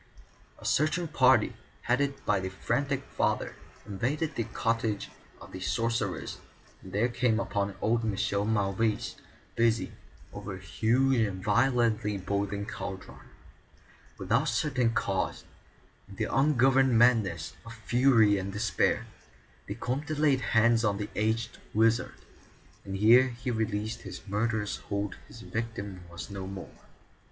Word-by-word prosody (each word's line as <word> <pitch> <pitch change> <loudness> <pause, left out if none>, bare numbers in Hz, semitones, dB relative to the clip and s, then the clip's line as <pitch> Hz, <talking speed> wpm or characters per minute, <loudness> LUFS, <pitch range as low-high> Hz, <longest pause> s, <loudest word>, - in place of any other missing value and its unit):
A - - -14
searching 155 +4 +1
party, 130 -7 +4 0.3
headed 135 +2 0
by 100 - +2
the 95 0 -3
frantic 135 +8 -1
father, - - -1 0.3
invaded 130 +10 -2
the 115 - -2
cottage 115 -2 -1 0.3
of - - -13
the 95 - -7
sorcerers 115 +4 -2 0.4
and 95 - -11
there 105 +5 +2
came 120 -2 +1
upon 100 -3 -2
old 115 +1 +2
Michel 100 -1 0
Mauvais, 105 0 0 0.4
busy 115 -1 +2 0.4
over 95 -2 -6
a - - -9
huge 120 +7 +2
and 95 -4 -1
violently 115 -2 +2
boiling 100 +1 -2
cauldron. 100 -3 -7 1.0
Without - - +1
certain 130 -6 +1
cause, 95 -4 -1 0.7
in 100 - -11
the - - -2
ungoverned 135 -2 +4
madness 110 -10 +3
of 115 0 -10
fury 115 -2 +4
and 95 +1 -4
despair, 105 +2 +1 0.6
the - - -4
Comte 145 +5 -3
laid 145 -3 +3
hands 115 0 +3
on 105 -2 +1
the 105 0 -4
aged 110 +2 -1 0.2
wizard, 115 +3 +2 0.7
and 95 0 -5
ere 120 +6 +6
he 125 +1 -4
released 110 -1 -2
his 95 +1 -9
murderous 105 0 -1
hold 100 0 -4
his 115 - -12
victim 100 -6 -5
was 85 +3 -8
no 95 -1 -5
more. 95 -1 -8
110 Hz, 130 wpm, -29 LUFS, 100-125 Hz, 1.0 s, ere